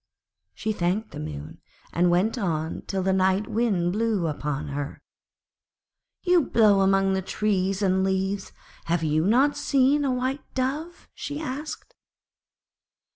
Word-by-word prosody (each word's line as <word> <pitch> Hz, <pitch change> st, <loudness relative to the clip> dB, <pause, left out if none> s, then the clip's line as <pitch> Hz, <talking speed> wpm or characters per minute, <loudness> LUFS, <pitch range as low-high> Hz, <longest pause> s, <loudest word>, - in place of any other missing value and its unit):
She 215 Hz, -, -2 dB
thanked 195 Hz, +4 st, -1 dB
the -, -, -7 dB
Moon, 75 Hz, -1 st, -7 dB, 0.3 s
and 175 Hz, +1 st, +3 dB
went 185 Hz, +7 st, +2 dB
on 165 Hz, -8 st, -2 dB
till 190 Hz, -1 st, -1 dB
the 190 Hz, 0 st, +2 dB
Night 190 Hz, +2 st, +2 dB
Wind 200 Hz, -7 st, +1 dB
blew 215 Hz, -4 st, 0 dB
upon 150 Hz, -2 st, -3 dB
her. 145 Hz, 0 st, -5 dB, 1.2 s
'You 360 Hz, -2 st, +4 dB
blow 210 Hz, -3 st, +5 dB
among 195 Hz, 0 st, +3 dB
all -, -, +2 dB
the 190 Hz, -, 0 dB
trees 195 Hz, 0 st, 0 dB
and 190 Hz, 0 st, +2 dB
leaves, 190 Hz, +1 st, -1 dB, 0.3 s
have 170 Hz, 0 st, 0 dB
not 190 Hz, -, +3 dB
you -, -, -10 dB
seen 275 Hz, +2 st, +3 dB
a 275 Hz, -, +1 dB
White 255 Hz, +3 st, -3 dB
Dove?' 295 Hz, +7 st, -3 dB
she 290 Hz, +1 st, -5 dB
asked. 300 Hz, -, -6 dB
195 Hz, 140 wpm, -25 LUFS, 175-255 Hz, 1.2 s, blow